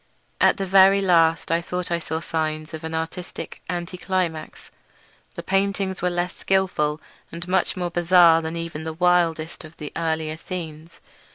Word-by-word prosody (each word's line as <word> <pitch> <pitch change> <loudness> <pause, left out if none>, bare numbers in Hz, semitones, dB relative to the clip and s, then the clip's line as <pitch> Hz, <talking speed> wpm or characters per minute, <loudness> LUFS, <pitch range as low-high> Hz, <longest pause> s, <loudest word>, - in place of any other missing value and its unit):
At - - +4
the 195 - -2
very 195 +1 +6
last 165 -4 +3
I 165 +1 +2
thought 180 +1 -4
I 170 - +1
saw 160 0 -4
signs 155 -1 -3
of 160 0 -7
an 160 0 -4
artistic 165 +2 -6
anti 175 0 -4
climax. 180 -4 -3 0.6
The - - -6
paintings 195 0 0
were 180 - +1
less 175 0 -2
skilful, 180 -6 0 0.3
and 170 +1 -7
much 185 0 +1
more 175 -1 -2
bizarre 175 -1 +5
than 160 +1 -4
even 165 -2 -5
the 160 0 -4
wildest 170 -2 +1
of 160 0 -13
the 150 -2 -7
earlier 160 -1 -2
scenes. 165 -2 -8
170 Hz, 165 wpm, -23 LUFS, 160-180 Hz, 0.6 s, very